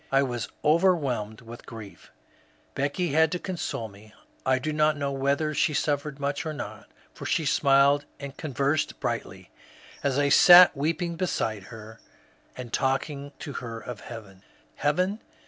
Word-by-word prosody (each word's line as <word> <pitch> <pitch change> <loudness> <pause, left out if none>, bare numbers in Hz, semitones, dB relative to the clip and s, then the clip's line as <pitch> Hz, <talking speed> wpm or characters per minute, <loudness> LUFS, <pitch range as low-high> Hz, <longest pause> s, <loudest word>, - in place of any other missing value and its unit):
I 135 0 +4
was 120 -3 -3 0.2
overwhelmed 150 - +1
with 115 +1 -12
grief. 105 -7 -11 0.6
Becky 145 +6 -1
had 160 +3 +3
to 180 - -2
oonsole 170 - -4
me. 105 +2 -17 0.3
I 130 0 +4
do 155 +4 -3
not 150 0 +2
know 140 -1 -2
whether 140 +3 0
she 150 +1 +1
suffered 145 -1 -1
much 140 0 -2
or 155 - -4
not, - - -8 0.3
for - - -7
she 160 - 0
smiled 140 0 +4
and 140 -1 -8
conversed 140 0 -1
brightly, - - -4 0.5
as 140 -2 0
I 145 0 +2
sat 180 +4 +9
weeping 165 +4 -2
beside 110 - -2
her, 110 0 -11 0.6
and 125 -2 -8
talking 140 +1 -1
to 145 - -7
her 115 -3 -6
of 120 -1 -8
heaven. 100 -5 -10 0.4
Heaven 180 +8 0
140 Hz, 150 wpm, -26 LUFS, 120-155 Hz, 0.6 s, sat